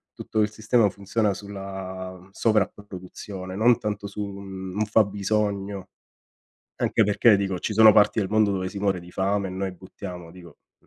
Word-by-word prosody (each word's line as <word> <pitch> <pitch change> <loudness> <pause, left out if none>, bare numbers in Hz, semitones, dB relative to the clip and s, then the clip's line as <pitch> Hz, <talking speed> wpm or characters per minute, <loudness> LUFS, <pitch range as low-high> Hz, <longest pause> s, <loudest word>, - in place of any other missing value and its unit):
tutto 110 - -2
il 105 0 +1
sistema 110 0 +2
funziona 100 +1 -1
sulla 95 -2 -7
sovrapproduzione, 95 -3 -3
non 115 +3 +4
tanto 105 -1 -3
su 105 +1 -6
un 95 -1 -7
un 105 +1 +1
fabbisogno 100 -1 0 0.9
Anche - - +2
perché 105 +1 +5
dico 95 -2 -2
ci 105 - -3
sono 110 0 +8
parti 105 +1 +4
del 95 - -1
mondo 110 -1 +3
dove 95 -1 -2
si 100 - -7
muore 100 -3 0
di 90 0 -13
fame 100 +1 0
e - - -6
noi 95 0 -3
buttiamo, 90 -1 -9
dico 85 -3 -14
mh - - -69
100 Hz, 165 wpm, -25 LUFS, 95-105 Hz, 0.9 s, sono